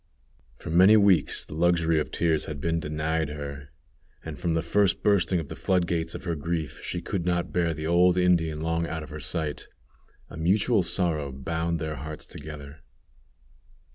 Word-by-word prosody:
For - - -7
many 95 +6 +7
weeks 100 -7 +3
the - - -10
luxury 85 -1 +2
of 75 - -2
tears 80 -3 0
had 75 -2 -6
been 85 +3 0
denied 80 0 -1
her, 70 -1 -7 0.6
and, - - -7
from 85 -2 0
that 80 - 0
first 100 +3 +2
bursting 95 -4 +3
of 80 - -5
the - - -7
flood 90 -2 +1
gates 85 -1 -2
of - - -7
her 85 -2 -2
grief, 80 -1 -3
she 85 -1 -4
could 95 -1 -2
not 85 0 -1
bear 85 -2 +1
the 80 +1 -5
old 90 +2 +4
Indian 85 -4 +2
long 80 +1 -1
out 80 -1 -4
of 75 - -11
her 75 - -6
sight. 75 +1 -3 0.6
A - - -10
mutual 100 +6 +2
sorrow 85 -5 -1
bound 80 +5 -2
their 80 -1 -4
hearts 75 +3 -7
together. 75 -1 -9
80 Hz, 180 wpm, -26 LUFS, 75-85 Hz, 0.6 s, many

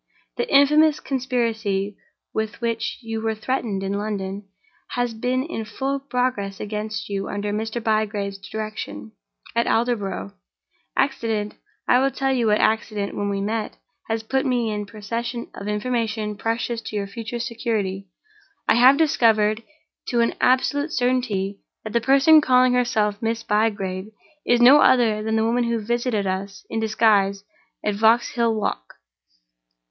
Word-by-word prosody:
The 480 - -2
infamous 300 +2 +5
conspiracy 225 -7 -1 0.4
with 220 0 -3
which 230 -2 -2
you 225 -1 -4
were 220 0 -1
threatened 215 -3 -2
in 195 0 -2
London 200 -1 -4 0.5
has 245 -1 -1
been 250 +3 -1
in 285 -7 -4
full 270 +6 -3
progress 250 -7 -2
against 215 +1 -4
you 195 -1 -3
under 205 0 -3
Mr. 220 +2 -2
Bygrave's 210 -2 -1
direction, 190 - -6 0.4
at 235 - +2
Aldborough. 205 - -1 0.6
Accident—I 220 +2 0
will 270 +1 +3
tell 270 0 -1
you 240 -3 +1
what 210 0 +4
accident 215 -2 0
when 205 0 -1
we 200 0 -1
meet—has 220 +1 -4
put 265 +4 0
me 245 -5 0
in 210 -1 -4
possession 230 +3 -5
of 200 - -7
information 215 -1 -1
precious 230 +2 -2
to 220 - -7
your 200 -1 -1
future 230 +4 -6
security. 220 -5 -2 0.6
I - - +4
have 260 +3 +7
discovered, 225 -8 +3 0.5
to 240 - 0
an 230 - +1
absolute 285 +4 +2
certainty, 245 -7 0 0.2
that 220 - -7
the 235 - +2
person 275 +5 +6
calling 255 -2 +4
herself 220 -4 +1
Miss 225 0 -1
Bygrave 205 -3 0 0.4
is 240 0 +4
no 265 +5 +8
other 230 -6 +4
than 220 +1 -1
the 220 0 +2
woman 240 +1 +1
who 235 -1 0
visited 235 -1 -1
us 195 +1 -4
in 225 - -1
disguise 210 -3 +2 0.4
at 210 - +1
Vauxhall 230 +2 +2
Walk. - - -3
225 Hz, 140 wpm, -23 LUFS, 205-245 Hz, 0.6 s, no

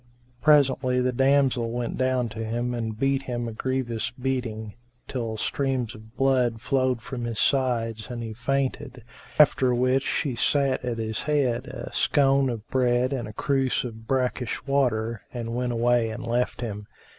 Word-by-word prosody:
Presently 135 -4 +4
the 125 0 +1
damsel 135 -2 +2
went 120 0 -3
down 130 -1 +1
to 110 +1 -5
him 120 +2 -2
and 110 -2 -3
beat 135 +2 +1
him 120 -3 -3
a - - -4
grievous 120 -1 -2
beating, 120 -4 -3 0.3
till 115 -4 -3
streams 130 -1 -1
of 110 +3 -15
blood 125 -4 +2
flowed 130 -1 0
from 125 -2 -5
his 115 -2 -4
sides 115 -4 +1
and 120 -1 -5
he 110 -1 -5
fainted; 130 +1 -2 0.3
after 135 -4 +5
which 130 +2 +2
she 140 0 -1
set 135 +1 +1
at 120 -2 -2
his 110 -1 -2
head 135 -4 0
a - - -7
scone 135 -2 +3
of 115 -2 -5
bread 125 0 +2
and 120 -5 -3
a 105 - -8
cruse 135 +2 0
of 110 -2 -8
brackish 125 -2 -1
water 115 -6 +1
and 115 -2 -4
went 125 0 -1
away 120 0 +2
and 120 +3 -6
left 120 +1 -1
him. 105 -3 -5
125 Hz, 165 wpm, -26 LUFS, 115-135 Hz, 0.3 s, after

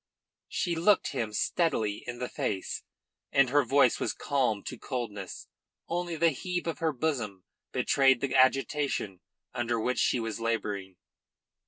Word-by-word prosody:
She 175 -4 -1
looked 185 +5 +3
him 115 -6 -2
steadily 110 - 0
in 120 0 -4
the 125 0 -3
face, 95 -5 -3 0.5
and 135 -2 +4
her 145 +1 +5
voice 130 0 +4
was - - -1
calm 125 -8 0
to - - -5
coldness. 110 -7 -5 0.4
Only 175 0 -2
the 165 +1 +4
heave 180 +5 -3
of 165 - -3
her 160 -1 +1
bosom 120 - -2 0.3
betrayed 135 -2 +4
the 140 0 -2
agitation 130 - +2 0.3
under 120 -1 -1
which 125 +3 0
she 125 - +2
was 115 -1 -3
labouring. 105 -5 -2
125 Hz, 145 wpm, -29 LUFS, 110-150 Hz, 0.5 s, her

